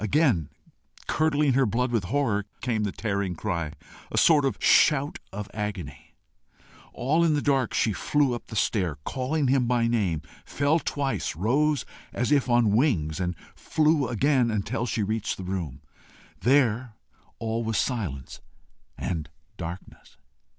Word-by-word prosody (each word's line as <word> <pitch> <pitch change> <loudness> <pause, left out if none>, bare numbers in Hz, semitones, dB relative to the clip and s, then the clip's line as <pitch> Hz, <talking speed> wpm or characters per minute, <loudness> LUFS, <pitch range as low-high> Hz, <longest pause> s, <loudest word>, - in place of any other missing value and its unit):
Again, 110 - +2 0.6
curdling 150 -3 +2
her 135 -1 +3
blood 125 +4 0
with 115 -6 0
horror, 110 -4 0 0.2
came 115 -3 0
the 100 - -2
tearing 100 -4 -2
cry, 85 -5 -3 0.4
a - - -3
sort 150 -4 +5
of 130 -7 0
shout 145 -1 +4
of 100 +1 -5
agony. 95 - -6 0.8
All 155 +7 +1
in 160 -2 +3
the - - +1
dark, 135 -4 +1
she 110 - +2
flew 140 +5 +1
up 120 - -6
the 110 - -8
stair, 95 -7 0
calling 135 +3 -1
him 130 -1 +2
by 120 -1 +2
name, 100 -10 0 0.2
fell 145 +4 +1
twice, 140 - -2
rose 140 - +1 0.3
as 125 +4 -1
if 140 -3 +3
on 120 -3 +4
wings, 95 - +1
and 90 -1 -1 0.2
flew 155 -3 +2
again 130 +1 +2
until 110 +3 -2
she 110 -1 -1
reached 110 +1 -2
the 95 - -6
room. 85 -7 -4 0.6
There 125 -3 +2 0.4
all 115 +1 -2
was 110 -1 -1
silence 90 - -3 0.6
and 80 -4 -3 0.3
darkness. 90 0 -9
115 Hz, 145 wpm, -26 LUFS, 100-140 Hz, 0.8 s, sort